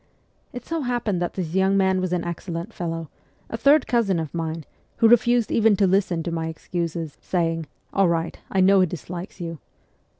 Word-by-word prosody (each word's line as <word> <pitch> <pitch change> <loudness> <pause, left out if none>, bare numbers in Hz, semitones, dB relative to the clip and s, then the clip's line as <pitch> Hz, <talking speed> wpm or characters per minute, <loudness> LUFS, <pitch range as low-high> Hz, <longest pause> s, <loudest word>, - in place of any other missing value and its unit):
It 245 -1 -8
so 330 -1 -2
happened 240 -8 -1
that 175 - -2
this 170 -4 -3
young 190 +1 +3
man 190 -1 +2
was 185 -1 -2
an 180 -1 0
excellent 170 +3 -5
fellow, 165 -2 -4 0.4
a - - -2
third 280 +4 +4
cousin 210 -8 +1
of 160 -3 -5
mine, 165 -1 -3 0.3
who 230 - +5
refused 240 0 +4
even 225 -2 +4
to 195 - +3
listen 185 -3 +1
to 170 - -3
my 165 -1 -2
excuses, 165 -1 -4
saying, 165 -3 -1
' - - -40
All 195 -1 +4
right. 165 -1 -1
I 190 - +2
know 195 +1 +6
he 185 - +4
dislikes 175 +3 -7
you.' 165 -3 -5
180 Hz, 195 wpm, -24 LUFS, 165-200 Hz, 0.4 s, know